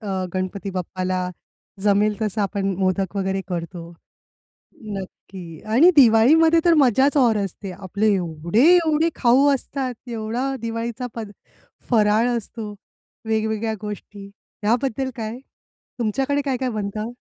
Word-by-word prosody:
अ, 190 -4 -3
गणपती 190 +1 -3
बाप्पाला 185 0 -3 0.5
जमेल 210 +1 +3
तसं 215 0 -1
आपण 195 -1 -1
मोदक 190 +1 0
वगैरे 195 0 -1
करतो. 170 -1 -5 1.1
नक्की 185 -3 -9
आणि 335 +9 +7
दिवाळीमध्ये 290 +7 +6
तर 340 -1 +5
मज्जाच 270 +2 +3
और 235 -4 +4
असते 195 0 -5
आपले 200 +3 0
एवढे-एवढे 270 - +3
खाऊ 255 +3 +4
असतात, 265 -1 -4
एवढा 235 +4 -2
दिवाळीचा 230 +2 -4
पद 220 -3 -6 0.6
फराळ 220 +1 +3
असतो, 215 -1 -6 0.5
वेगवेगळ्या 220 0 -1
गोष्टी 205 -1 -8 0.3
याबद्दल 260 +3 0
काय? 225 +1 -5 0.6
तुमच्याकडे 270 +6 0
काय-काय 260 -2 -1
बनतं? 215 +1 -4
215 Hz, 110 wpm, -22 LUFS, 195-250 Hz, 1.1 s, आणि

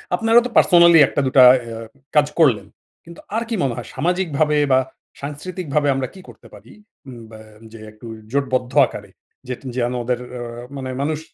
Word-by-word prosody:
আপনারাও 225 +4 +3
তো - - -3
পার্সোনালি 170 -2 +6
১ - - -7
টা - - +2
দুটা 130 0 +4 0.2
এ - - -9
আ - - -8 0.4
কাজ 150 -1 +4
করলেন। 135 -10 +3 0.4
কিন্তু 170 0 -13 0.2
আর 230 - 0
কি 230 - -1
মনে 130 -4 -1
হয় - - -7
সামাজিকভাবে 155 -1 0 0.2
বা 130 - +5 0.4
সাংস্কৃতিকভাবে 150 0 -3
আমরা 130 -1 -2
কি 190 - -13
করতে 115 - -16
পারি? 105 +3 -15 0.4
উম 125 -3 -10
বা 110 - -12 0.3
যে 115 - -12
একটু 110 +2 -14 0.2
জোটবদ্ধ 130 -2 -1
আকারে 100 -1 -10 0.4
যেট 125 -1 -6 0.2
যেন 120 0 -1
ওদের 125 0 -2
অ্যা 125 -1 -7 0.3
মানে 130 -1 -6
মানুষ 155 +1 -2
140 Hz, 180 wpm, -20 LUFS, 125-170 Hz, 0.4 s, পার্সোনালি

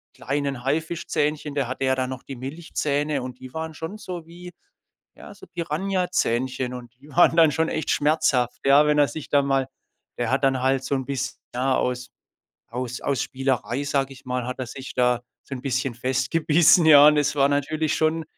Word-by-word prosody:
kleinen 140 -1 -3
Haifischzähnchen 150 0 -1
da 140 -3 0
hatte 130 +2 -3
ja 130 - +3
da 130 -1 -1
noch 130 0 -7
die 135 - -8
Milchzähne 145 +1 -2
und 125 0 -8
die 130 -1 -11
waren 160 0 -5
schon 165 +7 -6
so 175 -5 -7
wie 175 +2 -11 0.7
ja, - - -11
so - - -15
Piranhazähnchen. 160 -8 -1
Und 120 -2 -9
die 145 - -16
waren 165 +2 +4
dann 160 -2 +7
schon 160 +3 0
echt 155 - -3
schmerzhaft, 145 -5 +1
ja, 140 +2 +6
wenn 150 0 +2
er 145 -1 +5
sich 155 - -7
dann 140 -1 +3
mal 135 -1 +1 0.5
Der 120 -2 -1
hat 135 +1 +1
dann 135 -1 +2
halt 135 0 +1
so 140 - -1
'n 130 -1 -4
biss 135 -1 -4
ja, 130 +2 +1
aus 125 0 -2 0.6
aus 125 +1 -4
aus 140 -2 0
Spielerei, 135 -1 -2
sage 140 -1 -1
ich 135 +1 -15
mal, 125 -1 -2
hat 125 - -5
er 130 - -3
sich 135 +2 -8
da 125 -1 +2 0.2
so 135 - -7
'n 125 - -8
bisschen 130 -1 -1
festgebissen, 150 +7 +3
ja. 145 -2 +9
Und 150 - +4
es 145 0 +1
war 140 0 +4
natürlich 150 +2 0
schon 160 +1 +1
140 Hz, 195 wpm, -24 LUFS, 130-155 Hz, 0.7 s, ja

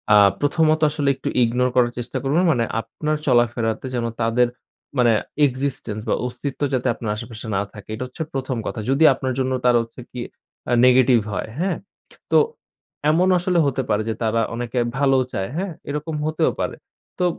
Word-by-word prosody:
আ - - +8 0.2
প্রথমত 155 +2 +2
আসলে 145 -2 0
একটু 135 - -4
ইগনোর 125 +2 +2
করার 120 -1 +4
চেষ্টা 120 0 -4
করবেন। 150 +7 +2
মানে 120 -6 +1 0.2
আপনার 150 +7 -3
চলাফেরাতে 120 -2 +1
যেন 120 -1 -1 0.2
তাদের 115 +2 +3 0.5
মানে 120 -2 +5 0.4
এক্সিস্টেন্স 130 -5 -3
বা - - +3
অস্তিত্ব 125 +3 -5
যাতে 125 -2 0
আপনার 110 -4 -4
আশেপাশে 115 0 -8
না 95 - +2
থাকে। 105 -1 -12
এটা 115 - -4
হচ্ছে 130 +5 -5
১ম 130 -2 -2
কথা। 110 - -4
যদি 135 +4 +3
আপনার 130 -1 -3
জন্য 130 0 0
তারা 125 -1 +5
হচ্ছে 115 +2 -12
কি 125 - -7 0.5
আ - - +3
নেগেটিভ 125 -1 +5
হয়, 100 - -3
হ্যা? 190 +2 +1 0.6
তো - - +6 0.7
এমন 175 +4 +3
আসলে 180 0 0
হতে 135 -1 0
পারে 105 0 +2
যে - - 0
তারা 115 +1 +1
অনেকে 120 +1 -2 0.2
ভালোও 135 -2 +3
চায়। 95 +2 -2
হ্যা, 190 +3 -1 0.2
এরকম 150 +2 -3
হতেও 155 0 +1
পারে। - - -2 0.4
তো 180 - +2
125 Hz, 175 wpm, -22 LUFS, 115-140 Hz, 0.7 s, আ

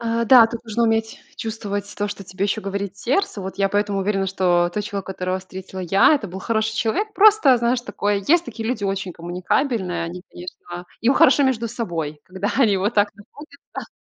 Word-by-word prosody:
А, 230 0 -1
да, 235 -1 +8
тут 230 0 -7
нужно 230 +1 -1
уметь 225 0 0 0.2
чувствовать 205 -2 -4
то, 205 0 -1
что 200 -1 -7
тебе 190 +2 -3
ещё 210 +2 -1
говорит 200 0 -4
сердце. 260 - -1
Вот 190 +1 -7
я 195 0 +2
поэтому 205 0 0
уверена, 195 0 0
что 175 -2 +2
тот 210 - -1
человек, 200 -3 -5
которого 185 -1 -3
встретила 190 0 -9
я,- 195 - +4
это 270 -8 -2
был 190 +2 -8
хороший 220 +1 -1
человек. 415 - -1
Просто, 410 - +6
знаешь, 240 +1 +1
такое 205 -4 -2
есть 345 +2 +4
такие 225 -1 -6
люди 220 -5 -2
очень 195 -2 -2
коммуникабельные. 180 - -2
Они, 180 +2 -7
конечно 175 0 -9 0.2
им 250 +4 +3
хорошо 285 -2 +5
между 235 -3 0
собой, 165 -10 -4
когда 190 +2 -4
они 215 -7 +4
вот 200 +5 -1
так 205 0 +2
находятся. 280 +7 -12
205 Hz, 195 wpm, -21 LUFS, 190-235 Hz, 0.2 s, да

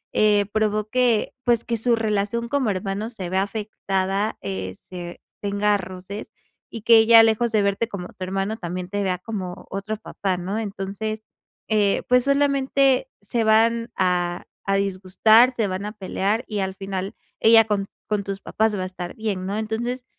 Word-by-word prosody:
eh, 210 -1 +4
provoque, 215 +2 +1
pues, 235 -2 +3
que 235 - -1
su 235 +2 +2
relación 220 +1 -1
como 275 -4 +1
hermano 195 +3 -3
se 210 -7 -6
vea 190 +1 +2
afectada, 200 -1 -2
eh, 95 -1 -4
se 175 -1 -8 0.2
tenga 205 0 +1
roces, 185 +2 -8 0.4
y 230 - -6
que 230 0 +7
ella 225 0 +8
lejos 225 +1 +2
de 215 -2 +3
verte 200 +3 0
como 200 -6 -6
tu 185 - -9
hermano, 195 +3 -2
también 180 -1 -5
te 205 +1 -2
vea 185 -2 0
como 185 -3 -6
otro 200 +3 -3
papá, 195 -3 -3
¿no? 190 +5 -3
Entonces, 215 +1 -4 0.5
eh, 210 -2 +2
pues, 250 0 +4
solamente 275 -2 +2
se 225 +3 -1
van 230 +2 +3
a 175 -1 0 0.2
a 195 - +1
disgustar, 200 +5 +4
se 225 -4 0
van 190 +1 -4
a 210 - -4
pelear, 205 +2 -1
y 210 -2 -3
al 190 -1 -2
final 195 +1 -4 0.2
ella 225 0 +7
con 205 -2 -1 0.2
con 210 -1 -1
tus 195 0 -5
papás 220 -1 0
va 185 - -2
a - - -2
estar 185 -1 -7
bien, 205 -4 -3
¿no? 200 +2 -2
Entonces, 240 +3 -3
210 Hz, 170 wpm, -23 LUFS, 190-225 Hz, 0.5 s, ella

